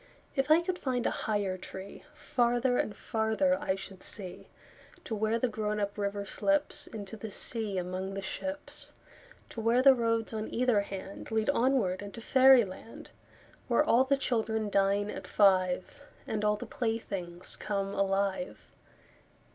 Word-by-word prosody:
If 270 0 0
I 315 +2 +7
could 360 +1 -3
find 250 -3 -1
a - - +2
higher 200 -3 -1
treeFarther 245 +4 -1
and 210 - -6
farther 225 +6 +1
I 190 - 0
should 195 -1 -10
see, 190 -4 -7 0.6
To - - -5
where 220 +1 +1
the 250 - +1
grown 210 -2 -2
up 200 0 -2
river 200 -1 -2
slipsInto 220 -6 -2
the 220 - -5
sea 215 -1 -1
among 185 +2 -3
the 195 - -3
ships. 285 +8 -5 0.6
To 230 - -6
where 235 +3 +3
the 270 0 +9
roads 230 -2 0
on 220 0 -4
either 245 -4 +3
handLead 200 +4 -2
onward 230 -8 +2
into 205 +3 -8
fairy 260 0 +6
land, 190 +4 -11 0.6
Where - - +4
all 260 -5 +4
the 275 +1 +2
children 220 -5 -1
dine 200 +1 +2
at 185 - -7
five, 185 -2 +2 0.2
And 210 -1 -2
all 210 0 +3
the - - -7
playthings 195 -7 -3
come 195 -1 -2
alive. 195 +5 -1
215 Hz, 145 wpm, -30 LUFS, 195-245 Hz, 0.6 s, the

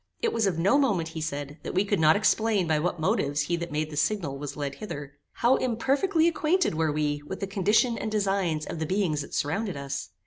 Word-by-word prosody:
It 460 - 0
was 220 -3 +2
of 180 -4 -1
no 195 +12 +3
moment, 195 - +1
he 160 -1 -6
said, 145 -1 -4
that - - -6
we 190 +2 +3
could 205 -2 0
not 155 0 +5
explain 215 -2 +2
by 155 -2 +1
what 175 +1 -1
motives 145 -2 +1
he 170 +4 0
that 170 0 -5
made 155 +1 -2
the - - -6
signal 150 -1 0
was 145 +1 -6
led 140 -2 -3
hither. 145 -7 -7 0.2
How 245 +3 +3
imperfectly 280 - +1
acquainted 340 - +1
were 160 -1 +1
we 145 -1 -1
with - - -5
the - - -2
condition 210 +5 +2
and 220 - -3
designs 195 -7 0
of 165 - -6
the 160 - -2
beings 180 -6 0
that 140 - -7
surrounded 185 +5 -1
us? 140 0 -5
170 Hz, 230 wpm, -27 LUFS, 150-215 Hz, 0.2 s, not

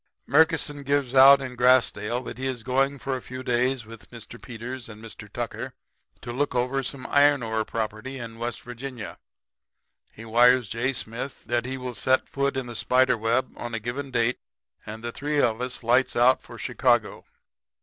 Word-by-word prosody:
"Murkison 155 -2 +2
gives 140 -2 0
it 135 - +5
out 135 +1 +8
in 130 -1 -6
Grassdale 125 -2 +2
that - - -7
he 135 - -2
is 125 -4 -4
going 135 +3 +1
for 135 -1 -3
a 130 - -5
few 130 +2 -8
days 125 0 0
with 115 -1 -13
Mr. 115 -3 -11
Peters 125 +1 -7
and 105 -1 -11
Mr. 115 0 -11
Tucker - - -5 0.5
to 120 - -6
look 140 +1 -1
over 125 +2 0
some 130 0 -5
iron 145 -2 +4
ore 110 -1 -1
property 110 +4 -4
in 115 -2 -8
West 120 0 -4
Virginia. 120 -2 -8 0.9
He 115 - -11
wires 120 +1 +4
J. 120 +3 -1
Smith 120 +3 -5
that 120 0 0
he 130 0 -4
will 125 -1 -5
set 130 +4 +1
foot 140 0 -1
in 130 - -2
the 120 -1 -8
spider 125 +2 +3
web 115 +3 0
on 120 -1 -5
a - - -2
given 130 +6 -5
date; 125 -1 0 0.5
and 110 +1 -7
the 120 - -3
three 145 +4 -2
of 115 -3 +1
us 125 -1 -3
lights 125 +3 +2
out 125 +2 +4
for 120 - -12
Chicago. 120 -1 0
125 Hz, 190 wpm, -25 LUFS, 115-130 Hz, 0.9 s, out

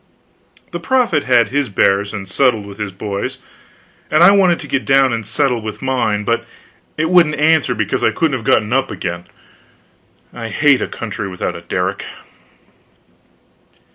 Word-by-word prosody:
The - - -4
prophet 245 - +1
had 120 -4 +3
his 140 0 -1
bears 100 +1 +1
and 100 -2 -6
settled 115 0 +1
with 100 +1 -11
his 105 -2 -3
boys; 100 +1 -5 0.7
and 155 +2 +4
I 185 - +8
wanted 185 -4 +3
to 145 - -9
get 135 -1 -1
down 135 -2 +3
and 115 -1 -3
settle 120 +2 0
with 110 0 -6
mine, 120 -6 -1
but 115 +2 0 0.5
it 160 +2 0
wouldn't 170 -4 +4
answer, 150 -4 +2
because 110 -2 -2
I - - +4
couldn't 145 +6 0
have 120 - -5
got 110 - +3
up 135 0 +1
again. 85 -1 -5 1.1
I 115 -2 -6
hate 140 +4 +3
a - - -1
country 105 -2 -6
without 90 -1 -4
a 85 - -8
derrick. 90 +3 -3
120 Hz, 165 wpm, -17 LUFS, 100-145 Hz, 1.1 s, I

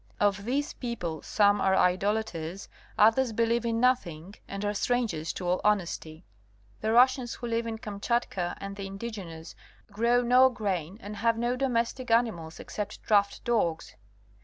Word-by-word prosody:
Of 200 -1 +1
these 280 +5 -1
people 180 -11 -4
some 205 -1 +3
are 190 0 +3
idolaters, 190 -1 0 0.3
others 225 +4 +4
believe 230 +1 +1
in 230 0 0
nothing 200 -9 0
and 200 +1 -5
are 205 - 0
strangers 210 -8 -1
to 180 - -5
all 180 +1 +1
honesty. 175 -5 -1 0.5
The 220 - -1
Russians 250 +1 +4
who - - -7
live 230 0 -1
in 225 -1 -4
Kamchatka 205 -3 -2
and 195 0 -6
the 200 -1 -6
indigenes 195 -6 -7 0.4
grow 235 +4 +2
no 250 +2 +6
grain 195 -6 -3
and 205 +1 -7
have 230 +2 +2
no 240 +2 0
domestic 250 -1 -1
animals 220 -9 0
except 210 0 -6
draught 200 -2 +2
dogs. 190 -9 -1
210 Hz, 150 wpm, -28 LUFS, 190-235 Hz, 0.5 s, no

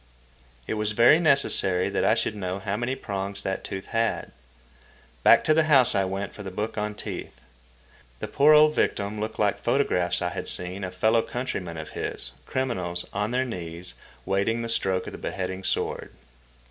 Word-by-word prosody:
It - - -3
was 105 0 -1
very 120 +8 +6
necessary 140 - +3
that - - -1
I - - +4
should - - -1
know 95 -2 -3
how 100 0 -3
many 120 +4 -2
prongs 100 -3 -4
that 95 0 -3
tooth 95 -1 -6
had. 115 0 -1 0.9
Back - - +6
to 155 - +4
the 160 0 +3
house 130 -5 +5
I 95 - +2
went 95 +2 -4
for - - -10
the 95 - -6
book 105 +4 -4
on 105 0 -3
teeth. 65 - -7 0.8
The - - -5
poor 145 +2 +4
old 150 0 +6
victim 105 -4 -1
looked 110 +1 -4
like 105 -2 +1
photographs 120 -9 +1
I 90 - -1
had - - -4
seen 90 +2 -2
of 90 -1 -5
fellow 110 +4 +3
countrymen 105 -10 -4
of 80 -1 -7
his, - - -5 0.2
criminals, 90 -10 -2
on 105 +2 -1
their 130 +2 0
knees, 90 -5 -6 0.3
waiting 100 +4 0
the 115 - -4
stroke 95 -4 0
of - - -6
the - - -9
beheading 95 0 -4
sword. - - -2
105 Hz, 185 wpm, -26 LUFS, 95-120 Hz, 0.9 s, very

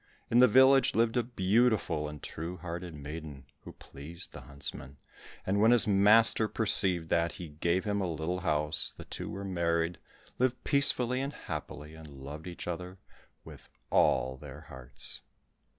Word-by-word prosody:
In 120 - +4
the 125 - +7
village 130 +3 +5
lived 115 +1 +1
a 120 - +3
beautiful 110 -7 0
and 75 -1 -11
true 85 +3 -6
hearted 85 0 -7
maiden, 75 -1 -9 0.2
who - - -10
pleased 80 +6 -11
the - - -10
huntsman, 70 -1 -7 0.5
and 100 +2 0
when 110 - +5
his 120 -1 +8
master 110 +2 +5
perceived 95 -7 +2
that, 85 0 0
he 85 -3 -9
gave 85 +5 -1
him 100 -1 -1
a 90 -3 -2
little 80 +3 -3
house, 75 -3 -1
the - - -10
two - - -7
were 100 0 -6
married, 85 -2 -1 0.4
lived 125 0 0
peacefully 130 -3 +2
and 140 +2 -4
happily, 75 -1 -8
and 80 -1 -12
loved 70 +3 -10
each 85 -1 -8
other 90 +2 -6 0.5
with - - -14 0.2
all 65 0 +2
their - - -11
hearts. 65 -1 -8
90 Hz, 160 wpm, -30 LUFS, 75-110 Hz, 0.5 s, his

